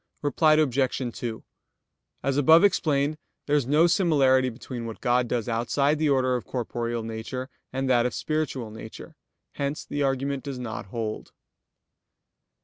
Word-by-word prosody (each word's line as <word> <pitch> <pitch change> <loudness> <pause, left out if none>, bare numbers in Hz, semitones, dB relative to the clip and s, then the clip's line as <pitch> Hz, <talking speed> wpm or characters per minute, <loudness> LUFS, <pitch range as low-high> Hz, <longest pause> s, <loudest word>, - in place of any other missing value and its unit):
Reply 155 +2 +4
Obj. 135 -4 +1 0.2
2: 115 -2 -5 0.8
As 135 - 0
above 160 +5 +6
explained, 155 -6 +2 0.3
there 145 - +1
is 140 -5 +1
no 150 +4 +5
similarity 140 -8 +3
between 120 0 -7
what 115 - -7
God 120 0 +2
does 120 -1 -2
outside 140 +6 +1
the 155 -1 +2
order 130 -2 +2
of 125 - -3
corporeal 120 -1 -3
nature, 115 +4 -5 0.2
and 135 +1 -2
that 125 -2 +3
of - - -5
spiritual 150 -7 -2
nature. 110 0 -10 0.4
Hence 140 +1 -3
the 145 - -3
argument 135 0 -1
does 140 -2 -5
not 115 -5 -6
hold. 110 +1 -5
130 Hz, 145 wpm, -26 LUFS, 120-145 Hz, 0.8 s, above